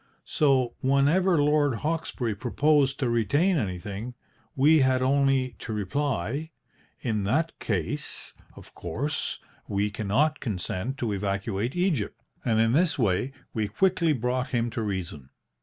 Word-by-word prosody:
So 135 -5 +2
whenever 145 +7 +3
Lord 145 -2 +3
Hawkesbury 150 -5 -2
proposed 135 +5 +2
to 130 - +2
retain 145 - +2
anything, 105 - -4 0.4
we 150 +4 +5
had 130 -1 +3
only 135 -2 +2
to 115 - -5
reply, 130 - -2 0.5
'In 110 -5 -1
that 155 +10 +1
case, 95 -8 -4 0.2
of - - -14
course, 135 - -3 0.3
we 100 +1 0
cannot 110 +9 +1
consent 105 +3 -3
to 120 -6 -2
evacuate 100 - -2
Egypt,' 175 - 0 0.2
and 110 -2 +2
in 115 0 +3
this 155 +2 +3
way 115 +2 +1 0.2
we 110 -2 -1
quickly 170 - +2
brought 125 -1 0
him 120 -2 -1
to 115 - -3
reason. 90 -10 -4
125 Hz, 130 wpm, -27 LUFS, 105-145 Hz, 0.5 s, we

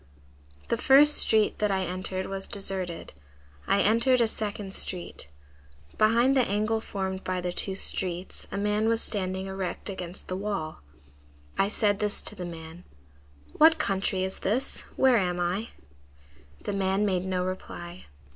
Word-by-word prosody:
5 70 - -25
"The - - +1
first 290 +2 +6
street 215 -1 +3
that 210 - +2
I 190 -1 +1
entered 185 +1 -3
was 195 0 -5
deserted. 190 -3 -2 0.5
I 200 - +3
entered 235 +4 +4
a 235 - +4
second 205 -3 -4
street. 175 - -2 0.7
Behind 235 +5 +4
the 265 - +5
angle 215 0 0
formed 190 -3 -4
by 185 0 -2
the 180 0 -3
two 190 +1 0
streets, 185 -1 -1
a 200 - -3
man 210 +2 +1
was 230 0 +2
standing 190 -3 -1
erect 190 +1 -4
against 180 -1 -5
the 185 - -3
wall. 195 -6 -4 0.7
I 195 - +2
said 205 -1 +1
to 210 - +1
this 205 0 0
man:— 165 -1 -8 0.7
"'What 320 +1 +6
country 195 -7 0
is 190 0 -3
this? 245 +7 -1
Where 260 -2 +5
am 180 -3 0
I?' 180 +6 -1 0.9
The 205 - -3
man 195 +1 +1
made 185 -2 0
no 185 -1 -1
reply. 180 -1 -7
195 Hz, 155 wpm, -27 LUFS, 185-215 Hz, 0.9 s, first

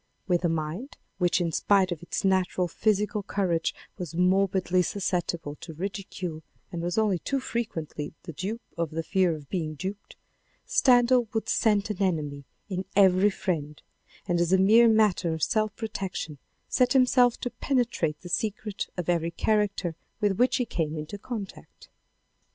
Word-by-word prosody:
With 180 -2 +1
a 170 - +3
mind, 165 - -3 0.2
which 180 0 +2
in 170 -2 0
spite 190 +2 +3
of 170 -2 -4
its 175 - -3
natural 185 -1 +2
physical 210 +4 0
courage 185 -4 -1 0.2
was 170 -3 -5
morbidly 185 0 +2
susceptible 175 -5 -2
to 160 - -9
ridicule 185 -2 -5 0.3
and 170 - -4
was 175 +3 -2
only 210 -5 +2
too 275 +9 -1
frequently 165 - -4
the 165 - -7
dupe 210 +9 -4 0.2
of 170 -2 0
the 165 +1 -3
fear 185 -2 +2
of 150 -2 -11
being 155 -3 -3
duped, 190 +6 -6 0.5
Stendhal 245 -2 +4
would 220 - -1
scent 210 -2 +2
an 200 -1 -5
enemy 150 -7 -1 0.2
in 185 -2 -3
every 190 0 +5
friend, 155 -7 -3 0.5
and 175 -2 +1
as 175 0 +1
a 190 - +6
mere 220 +5 +6
matter 210 -7 +3
of 160 - -4
self 215 -2 +1
protection 190 - -5 0.3
set 250 0 +2
himself 250 -2 +4
to 245 - -2
penetrate 240 - -1
the 180 - -9
secret 210 +1 -2
of 180 - -3
every 170 -1 +1
character 200 -2 0 0.2
with 205 -3 +1
which 250 +1 +4
he 250 - 0
came 160 -7 -2
into 155 +7 -6
contact. 210 -4 -8
190 Hz, 160 wpm, -27 LUFS, 170-215 Hz, 0.5 s, a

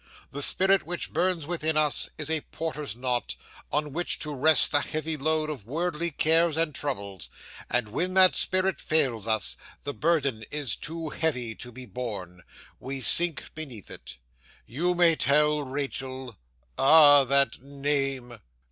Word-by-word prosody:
The 145 - -6
spirit 190 +6 +3
which 175 0 -1
burns 175 -2 0
within 160 -1 -2
us, 150 -2 +2
is 150 - -4
a 160 -1 0
porter's 150 -9 -5
knot, 125 -2 -2 0.4
on 150 -1 -1
which 175 +3 0
to 150 -1 -4
rest 150 +3 +4
the 145 - +4
heavy 155 +2 -4
load 155 +1 -1
of 120 -9 -8
worldly 170 +3 -2
cares 160 +1 +2
and 165 -2 0
troubles; 100 -10 -5 0.4
and 125 -2 0
when 180 - -2
that 185 -1 +7
spirit 185 0 +2
fails 130 -9 0
us, 110 -1 +1 0.3
the 145 - -4
burden 140 -9 0
is 145 -7 +1
too 165 0 -6
heavy 125 -8 -2
to 125 +2 -10
be 130 +2 -10
borne. 100 -9 -7 0.4
We 135 +1 -5
sink 170 +3 +2
beneath 135 -10 -9
it. 60 0 -9 0.5
You 175 +9 -1
may 170 -2 +4
tell 150 +2 +2
Rachael 130 -2 -5 0.4
Ah, 145 0 +7
that 135 -3 +2
name! 135 -3 -3
145 Hz, 150 wpm, -26 LUFS, 125-160 Hz, 0.5 s, that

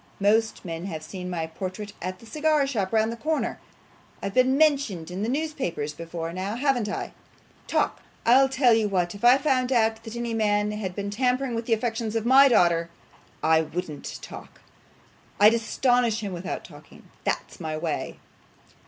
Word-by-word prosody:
Most 220 +2 +2
men 165 0 -5
have 160 -5 -5
seen 180 +3 -7
my 170 -3 -2
portrait 185 +5 -6
at 185 0 -4
the 230 - -16
cigar 305 +3 +1
shop 210 -9 -2
round 220 0 +2
the - - -4
corner. 310 +6 -2 0.6
I've 195 - -3
been 255 +1 +3
mentioned 275 - +2
in 185 +2 -4
the 220 - -1
newspapers 265 - -2
before 165 +1 -6
now, 190 +4 -3
haven't 250 -4 +1
I? - - -4 0.5
Talk! - - 0 0.2
I'll 265 +3 +6
tell 260 -2 +4
you 220 -2 +2
what; 180 -3 0
if 200 - -12
I 245 +2 +7
found 265 -2 +1
out 225 -2 +2
that 225 0 -8
any 235 -1 -3
man 210 -1 +1
had 200 -4 -4
been 200 0 -3
tampering 250 +3 0
with 230 0 -3
the 230 - +3
affections 225 -1 -2
of 225 0 -1
my 270 +3 +7
daughter, 170 -8 +3 0.5
I 160 0 +4
wouldn't 160 -1 -5
talk. - - -11 0.8
I'd 210 +2 +7
astonish 235 0 +1
him 200 -3 -4
without 175 +1 -5
talking; - - -15 0.2
that's - - -3
my 155 -2 -3
way. - - -3
220 Hz, 175 wpm, -25 LUFS, 185-250 Hz, 0.8 s, I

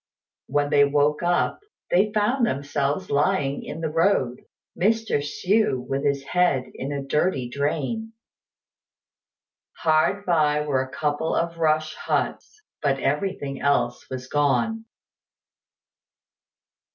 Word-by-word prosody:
When 145 +1 0
they 145 -1 +6
woke 145 +1 +2
up, 175 - +1 0.3
they 200 +4 +3
found 220 +5 +1
themselves 145 -2 -1
lying 140 -1 +1
in 160 - -7
the 160 - -1
road, 160 -7 +1 0.3
Mr. 220 -1 +1
Hsü 185 +4 +1
with 135 +2 -2
his 140 -1 0
head 175 -5 +1
in 135 +2 -5
a 140 -1 -3
dirty 135 -2 0
drain. 150 - -2 1.6
Hard 160 +6 +2
by 150 -4 +2
were 145 -3 0
a 130 - -5
couple 150 +4 -1
of 170 0 -1
rush 155 -1 +1
huts; 430 - -3 0.2
but 140 -2 +1
everything 145 0 -2
else 140 0 0
was 130 -1 -5
gone. 145 - 0
150 Hz, 115 wpm, -24 LUFS, 140-180 Hz, 1.6 s, they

